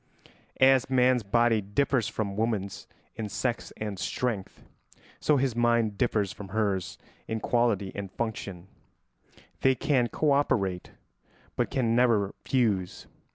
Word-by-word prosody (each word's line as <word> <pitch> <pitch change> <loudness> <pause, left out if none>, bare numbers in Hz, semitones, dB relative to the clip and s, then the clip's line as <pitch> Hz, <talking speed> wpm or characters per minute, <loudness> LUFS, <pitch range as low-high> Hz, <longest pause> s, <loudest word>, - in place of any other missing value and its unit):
As 130 -1 +5
man's 125 -1 +3
body 115 +2 +2
differs 115 +4 0
from 100 -3 -3
woman's 105 -3 -2 0.3
in 110 -1 -4
sex 120 +5 -2
and 105 -3 -4
strength, 115 -5 -3 0.6
so 150 - +3
his 130 -3 0
mind 120 -3 +2
differs 105 -4 0
from 100 - -9
hers 95 -4 -1 0.3
in 110 0 -2
quality 110 -5 +1
and 100 -2 -6
function: 100 -6 -5 0.9
they 130 0 +3
can 125 -1 +1
co 150 +4 0
operate 100 -10 +1 0.7
but - - 0
can 115 -3 +1
never 115 -5 +3
fuse. 105 -9 0
110 Hz, 125 wpm, -28 LUFS, 100-125 Hz, 0.9 s, As